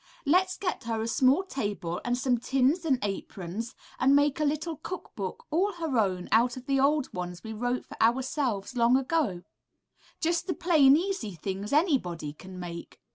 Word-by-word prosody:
Let's 365 +5 +3
get 360 - -3
her 225 -1 -1
a - - -2
small 265 +8 +3
table 205 - -3
and 245 0 0
some 250 -1 +1
tins 270 +7 +1
and 275 -5 +3
aprons, 200 +2 -4 0.2
and 275 +2 +5
make 285 0 +3
a - - +1
little 305 +2 -1
cook 370 - -7
book 195 -5 -5
all 380 +6 +2
her 325 -6 -3
own 185 -4 0
out 240 +3 +3
of 255 - -9
the 275 0 +1
old 285 +1 +2
ones 180 -1 -5
we 220 -1 -6
wrote 245 +3 -2
for - - -9
ourselves 245 -2 +1
long 240 +1 +4
ago, 265 - 0 0.8
just 335 +2 0
the 355 - -1
plain, 300 -5 +5
easy 340 - -3
things 195 +5 -4
anybody 245 - +1
can 185 +4 -11
make.'' 170 -1 -8
255 Hz, 180 wpm, -28 LUFS, 205-305 Hz, 0.8 s, and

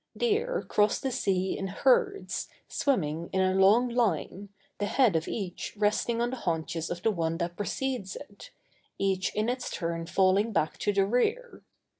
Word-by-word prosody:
Deer 480 +2 0
cross 210 0 +2
the 265 - -2
sea 190 -6 0
in 195 - -3
herds, 400 - +1 0.2
swimming 170 - -1
in 190 - 0
a 185 0 +3
long 200 +6 +5
line, 205 - -1 0.3
the 205 - 0
head 245 -8 +3
of 160 0 0
each 190 -3 -5
resting 215 +3 +1
on 240 +1 0
the 260 - -4
haunches 165 -4 -2
of 175 0 -5
the 225 - +3
one 165 -3 -1
that 175 0 -3
precedes 210 -1 -3
it, 290 +11 -11 0.5
each 190 -1 0
in 215 +1 0
its 250 +1 -2
turn 165 -2 -3
falling 195 +4 +3
back 155 -6 0
to 205 - +1
the 195 -1 +2
rear. 435 - 0
205 Hz, 170 wpm, -28 LUFS, 180-250 Hz, 0.5 s, long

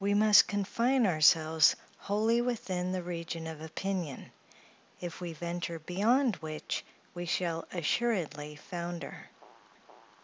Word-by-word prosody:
We 200 +1 +2
must 210 0 +7
confine 230 +5 +1
ourselves 160 -2 +5 0.2
wholly 220 +4 +1
within 190 -7 -2
the 185 -1 -2
region 170 -1 -5
of 160 -1 -7
opinion; 170 -2 -4 0.7
if 175 0 -7
we 175 -1 -4
venture 170 +1 -4
beyond 210 - +2
which, 155 -1 -4 0.3
we 175 0 -5
shall 165 -1 -1
assuredly 160 - -1
founder. 170 +2 -7
175 Hz, 110 wpm, -31 LUFS, 160-205 Hz, 0.7 s, must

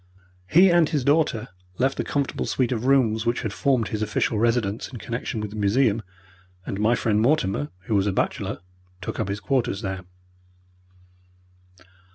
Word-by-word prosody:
He 180 - +6
and 170 -3 +4
his 145 -4 0
daughter 145 -5 +1 0.3
left 135 +2 +1
the - - 0
comfortable 140 -2 -2
suite 130 -2 0
of 120 -1 -2
rooms 120 -5 +3
which 120 +1 0
had 110 -3 -3
formed 130 -5 +1
his 110 - -3
official 110 0 0
residence 115 -2 0
in 125 - -9
connection 115 +3 -4
with 105 -1 -5
the - - -8
museum, 110 +2 +2 0.6
and 95 - -4
my 110 +3 +3
friend, 110 -2 +1
Mortimer, 95 - +1
who 105 +4 -4
was 100 -1 +2
a - - +2
bachelor, - - -2 0.4
took 95 - -5
up - - -1
his 100 +1 -3
quarters 120 -5 -1
there. 95 -2 -4
115 Hz, 170 wpm, -24 LUFS, 105-130 Hz, 0.6 s, He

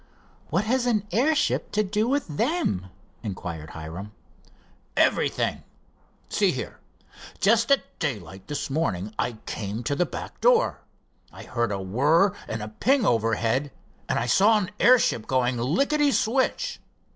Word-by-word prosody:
"What 180 +7 +1
has 250 +2 +1
an 215 -4 +1
airship 275 - +1
to 215 - +2
do 210 +3 0
with 280 +3 +1
them?" 200 - -1 0.3
inquired 85 -7 -6
Hiram. 85 +7 -8 0.8
"Everything. - - +1 0.7
See - - +2
here, - - -6 0.6
just 230 +3 +3
at 275 - +1
daylight 95 - -4
this 145 -1 -4
morning 110 - -1
I 120 - 0
came 105 +2 -4
to 145 - -1
the 180 - +1
back - - -8
door. - - +3 0.5
I - - -11
heard 120 -3 -1
a 100 - -2
whir 145 - +3
and 110 -1 -4
a 105 - -6
ping 250 - +2
overhead, 115 +3 +1 0.4
and - - +1
I 115 - 0
saw 200 - +5
an 200 -2 -2
airship 240 - +4
going 125 -1 +1
licketty 280 - +2
switch. 270 - 0
150 Hz, 140 wpm, -25 LUFS, -, 0.8 s, saw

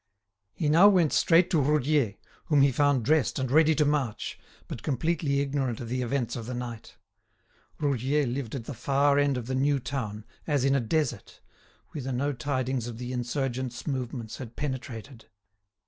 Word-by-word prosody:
He 160 - -1
now 165 +7 +7
went 180 -7 +4
straight 170 +2 +4
to 160 -5 +3
Roudier, 145 -5 +2 0.3
whom 145 -3 +4
he 140 - +4
found 140 -2 +2
dressed 155 0 +2
and 130 -2 -2
ready 155 +2 +5
to 150 - +3
march, 145 -7 -1 0.3
but - - -6
completely 145 0 0
ignorant 135 -4 -1
of 120 - -6
the 125 +1 -1
events 125 0 -1
of 115 -2 -6
the 125 - -4
night. 120 -2 -7 0.8
Roudier 140 0 +1
lived 125 -1 -3
at 120 -4 -5
the 145 - -5
far 140 +3 +2
end 140 -2 +2
of 120 - -4
the 130 - -3
new 140 +2 +2
town, 110 -6 -4 0.2
as 145 -4 +1
in 135 - +3
a 140 - +3
desert, 150 +5 -2 0.5
whither 135 -3 -4
no 140 +3 0
tidings 130 -2 -2
of 120 -2 -6
the 125 +1 -5
insurgents' 125 0 -3
movements 125 -5 -4
had 120 -3 -9
penetrated. 130 -4 -6
135 Hz, 175 wpm, -27 LUFS, 120-145 Hz, 0.8 s, now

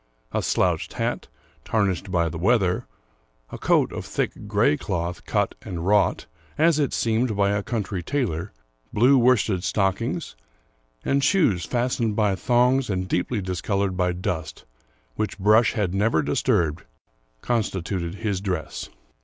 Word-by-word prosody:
A - - 0
slouched - - 0
hat, - - -2 0.4
tarnished 100 -3 0
by 85 -3 +1
the 80 0 -5
weather, 95 -2 +2 0.6
a - - -7
coat - - +2
of - - -4
thick - - -3
gray 75 - +3
cloth, 85 0 -3
cut - - 0
and 85 -2 -5
wrought, 105 +1 +2 0.3
as 160 0 +4
it 140 -4 +1
seemed, 115 -1 0
by 100 0 +3
a 100 0 0
country 105 -4 -3
tailor, 100 - -2 0.4
blue 125 +6 +5
worsted 115 -7 +3
stockings, 110 - -1 0.7
and 140 0 +1
shoes 145 - +3
fastened 120 -3 0
by 105 -2 +2
thongs 125 +4 +2
and 95 -2 -1
deeply 100 +4 -1
discolored 95 +1 -1
by 90 0 +1
dust, 85 -3 -4 0.5
which 105 -3 -2
brush 110 +3 +4
had 100 -6 -1
never 95 -5 +2
disturbed, 80 - +1 0.6
constituted 95 -6 -2
his 100 -3 -2
dress. 90 -6 -4
100 Hz, 135 wpm, -24 LUFS, 90-115 Hz, 0.7 s, blue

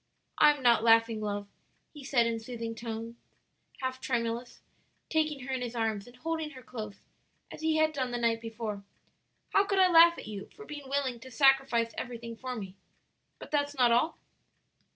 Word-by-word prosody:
"I 300 - +8
am 270 - -10
not 235 -2 +5
laughing, 225 -1 +4
love," 205 -1 -3 0.5
he 295 -2 -11
said 260 -3 +3
in 230 -1 -1
soothing, 230 0 -6 1.1
half 260 0 -3
tremulous 235 -1 -2
tones, - - -25 0.5
taking 310 -3 +1
her 265 +1 -4
in 260 - -2
his 245 -1 -4
arms 220 -3 -1
and 245 - -14
holding 320 +3 -3
her 255 - -11
close, 215 -4 -8 0.5
as - - -9
he 320 0 +1
had 315 0 +3
done 260 -3 -1
the 245 - -2
night 230 -1 +1
before. 220 -3 -5 0.7
"How 395 - +5
could 395 -1 -1
I 370 -1 +5
laugh 340 0 +8
at - - -8
you 205 -2 -7
for 430 - -11
being 290 -5 -8
willing 270 -3 -1
to 260 - -11
sacrifice 270 -3 +3
everything 235 -2 -6
for 255 +2 -5
me? 195 -4 -7 0.6
But - - -11
that's 290 -1 0
not 245 -2 +5
all?" 245 +8 +2
245 Hz, 185 wpm, -30 LUFS, 230-285 Hz, 1.1 s, I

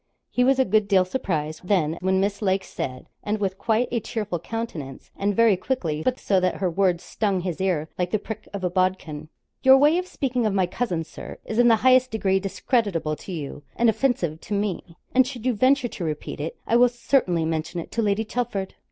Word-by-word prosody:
He 250 - +2
was 265 +1 +4
a 265 - +3
good 215 0 +2
deal 190 -2 +4
surprised, 160 - -3
then, 170 -5 +1
when 190 +1 +2
Miss 200 +2 -1
Lake 190 -1 +1
said, 130 -7 -5 0.2
and 210 +1 -1
with 195 -2 -2
quite 225 +3 +1
a 235 - +1
cheerful 210 -5 -3
countenance, 170 - -6
and 200 0 0
very 230 -2 +5
quickly, 175 -8 -2
but 255 +8 0
so 195 -2 +2
that 185 0 +1
her 185 -2 -1
words 180 -1 +1
stung 200 -3 -1
his 180 0 -4
ear 175 -5 0
like 180 -1 0
the 215 - +1
prick 215 +1 -7
of 200 -2 -6
a 180 - +1
bodkin. 180 -5 -1 0.3
'Your 265 0 +8
way 300 +5 +4
of 365 - -5
speaking 250 -8 -1
of 200 - -1
my 190 -2 +3
cousin, 175 -3 -2
Sir, - - -10
is 220 - -2
in 240 - +6
the 230 - +7
highest 255 0 +6
degree 195 -4 +1
discreditable 195 - -1
to - - -9
you 145 -4 -5
and 235 -1 +4
offensive 185 - -1
to 205 - -3
me, 195 -4 -3 0.2
and 255 0 +5
should 250 -3 -7
you 255 - +2
venture 255 +3 +3
to 185 - -6
repeat 155 -3 -4
it, 155 +3 -4
I 235 - +3
will 245 0 +6
certainly 235 -9 +1
mention 160 +2 -2
it 165 - -8
to 230 - 0
Lady 210 +1 +1
Chelford.' 220 -5 -3
200 Hz, 220 wpm, -24 LUFS, 175-235 Hz, 0.3 s, Your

